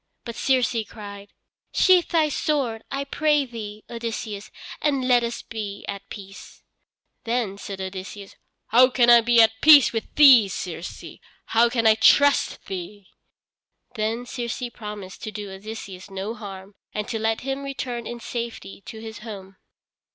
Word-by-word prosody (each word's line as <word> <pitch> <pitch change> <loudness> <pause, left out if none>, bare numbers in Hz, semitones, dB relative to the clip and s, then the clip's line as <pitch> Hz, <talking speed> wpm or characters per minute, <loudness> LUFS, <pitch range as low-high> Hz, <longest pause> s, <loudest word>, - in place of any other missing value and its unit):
But 235 - -5
Circe 255 -2 +1
cried: 200 -1 -10 0.4
"Sheathe 365 -2 +4
thy 315 -2 +2
sword, 270 -7 -1
I 275 0 -2
pray 295 0 +1
thee, 215 -4 -8
Odysseus, 225 -3 -5 0.3
and 275 -4 0
let 245 -2 +4
us 235 0 -4
be 210 -3 -6
at 200 -1 -7
peace." 195 -1 -11 0.6
Then 230 -4 -2
said 195 -1 -7
Odysseus: 190 +1 -7 0.3
"How 250 +3 +6
can 240 -2 +4
I 235 -1 +8
be 235 +1 +3
at 220 0 +1
peace 295 -5 +8
with 225 - -4
thee, 265 -8 +8
Circe? 175 -2 -6 0.4
How 235 +1 +3
can 230 -1 -1
I 220 - +7
trust 285 +6 +3
thee?" 190 +1 -7 0.8
Then 225 +1 -2
Circe 240 0 -5
promised 210 -4 -8
to 215 - -5
do 205 -2 -7
Odysseus 195 -1 -9
no 195 +3 -4
harm, 195 -3 -9 0.2
and 210 0 -3
to 225 - -2
let 220 0 0
him 270 +1 -3
return 255 -4 -5
in 240 - -6
safety 235 -4 -6
to 220 - -8
his 220 0 -8
home. 195 -4 -10
225 Hz, 150 wpm, -24 LUFS, 205-245 Hz, 0.8 s, I